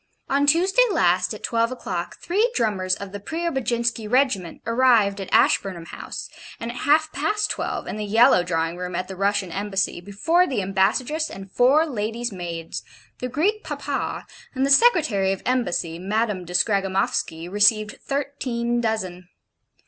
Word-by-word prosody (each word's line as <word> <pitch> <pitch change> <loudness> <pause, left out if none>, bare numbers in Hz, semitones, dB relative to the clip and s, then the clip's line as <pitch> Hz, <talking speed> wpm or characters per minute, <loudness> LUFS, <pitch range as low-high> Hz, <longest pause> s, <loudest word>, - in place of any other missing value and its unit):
On 285 +1 +2
Tuesday 370 - +4
last, 180 - +2
at 215 - -7
twelve 230 +1 +1
o'clock, 180 -8 -5
three 425 +7 0
drummers 190 -4 +1
of 200 -1 -8
the 205 - -6
Preobajinski 235 - -2
Regiment 250 -10 +1
arrived 230 -4 +3
at 190 - -7
Ashburnham 180 -4 +2
House, - - -7 0.3
and 230 +1 -4
at 245 - -9
half 310 +2 +2
past 320 +10 -1
twelve, - - -3
in - - -5
the 215 - -3
yellow 215 -2 +5
drawing 165 -1 -2
room 180 0 -5
at 185 +1 -3
the 190 - -7
Russian 200 -1 0
Embassy, 195 -2 -2
before 215 - +1
the 230 -7 -1
ambassadress 220 - 0
and 195 0 -10
four 275 +9 +4
ladies' 235 -3 -3
maids, 170 -3 -6 0.4
the 250 - -3
Greek 400 - 0
Papa, - - -4 0.3
and 265 +1 +1
the 275 - +1
Secretary 280 - +4
of 195 - -8
Embassy, 175 -9 -1
Madame 205 0 -1
de 175 - -9
Scragamoffsky 190 -3 0
received 210 +2 +2
thirteen 250 -4 -2
dozen. 185 -6 -3
215 Hz, 155 wpm, -23 LUFS, 190-265 Hz, 0.4 s, yellow